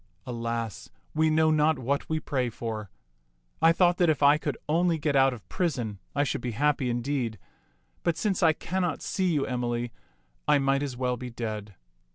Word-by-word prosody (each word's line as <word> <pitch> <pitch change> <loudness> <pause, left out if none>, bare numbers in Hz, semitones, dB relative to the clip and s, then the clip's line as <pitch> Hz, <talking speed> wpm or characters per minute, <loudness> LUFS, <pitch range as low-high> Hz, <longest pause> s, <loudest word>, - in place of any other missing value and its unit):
Alas, 115 -2 -4 0.2
we 155 0 +3
know 155 0 +4
not 155 0 +3
what 135 +3 -2
we 160 0 0
pray 130 -5 -1
for. 110 -3 -5 0.7
I 165 - +7
thought 175 +1 +3
that 175 -2 +4
if 150 -2 +1
I 145 +2 +6
could 145 -2 -3
only 170 +2 +2
get 150 -1 0
out 135 0 +5
of 120 -5 -9
prison, 125 - -2 0.2
I 145 - +3
should 140 - -2
be 120 -1 -3
happy 145 -2 +2
indeed; 120 -2 -1 0.6
but 170 -2 0
since 195 +1 0
I 165 -3 +6
cannot 175 0 -2
see 185 -2 0
you, 145 -4 +1
Emily, 120 -1 -2 0.6
I 150 -1 +5
might 135 0 +2
as 135 -4 -3
well 125 -1 0
be 125 +1 -6
dead." 110 -4 -5
140 Hz, 185 wpm, -27 LUFS, 120-155 Hz, 0.7 s, I